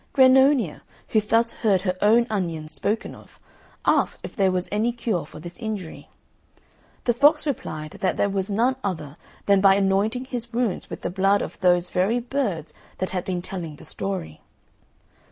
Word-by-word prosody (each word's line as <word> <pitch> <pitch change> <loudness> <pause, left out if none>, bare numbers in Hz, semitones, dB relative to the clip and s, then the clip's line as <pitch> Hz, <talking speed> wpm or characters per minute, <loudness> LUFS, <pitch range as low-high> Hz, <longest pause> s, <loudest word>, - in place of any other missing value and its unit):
Grannonia, 265 - +5 0.3
who 215 - +3
thus 225 +2 +2
heard 200 -5 +1
her 185 -1 -1
own 225 +3 +5
onions 165 -6 -2
spoken 215 +2 -1
of, - - -16 0.5
asked - - +2
if - - -8
there 195 -2 +3
was 180 0 -1
any 215 +4 +1
cure 220 -10 -2
for - - -11
this 175 +6 -9
injury. 215 -7 -6 0.9
The 240 - +2
fox 290 +7 +4
replied 155 - -4
that 190 - 0
there - - +2
was 195 0 -2
none 240 +6 +1
other 155 -7 -4 0.3
than 200 -1 +4
by 195 -1 +6
anointing 200 +6 +1
his 240 -3 -5
wounds 230 -5 -1
with - - -7
the - - -3
blood 195 +2 +2
of - - -8
those 180 -1 +2
very 195 +7 +1
birds 235 - -2 0.2
that 185 - -3
had 180 -2 -2
been 180 -2 -3
telling 170 -5 -6
the - - -14
story. 190 - -5
200 Hz, 170 wpm, -24 LUFS, 180-235 Hz, 0.9 s, by